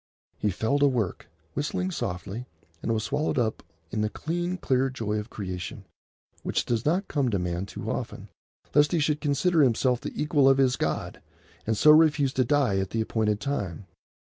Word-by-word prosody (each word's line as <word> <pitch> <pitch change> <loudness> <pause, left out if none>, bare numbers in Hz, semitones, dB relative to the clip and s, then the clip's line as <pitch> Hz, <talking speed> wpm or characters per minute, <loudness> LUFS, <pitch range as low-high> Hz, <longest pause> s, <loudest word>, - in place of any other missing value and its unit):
He 105 - +1
fell 110 +9 0
to 145 - +5
work, 120 -8 -2 0.2
whistling 180 +6 -2
softly, 100 - -4 0.3
and - - -1
was 110 -1 0
swallowed 145 +3 -1
up 115 -3 0 0.3
in 105 - -1
the 105 - +1
clean, 175 +7 -3
clear 135 -5 +1
joy 110 -5 -2
of 105 +2 -7
creation, 90 -5 -6 0.6
which - - -1
does 120 +2 -1
not 185 +6 +1
come 140 -4 0
to 100 - 0
man 90 +1 -2
too - - -7
often, - - -5 0.4
lest 145 +2 +4
he 170 - +3
should 150 0 +1
consider 155 +3 +2
himself 125 -1 +2
the - - -6
equal 145 -2 +4
of 135 - +5
his 130 -2 +3
God, - - -3 0.5
and 110 -1 +1
so 150 - +7
refuse 150 -3 +5
to 130 - +2
die 125 -7 +2
at 95 -1 -2
the 115 - -1
appointed 110 -2 0
time. 105 - -3
130 Hz, 185 wpm, -27 LUFS, 105-145 Hz, 0.6 s, so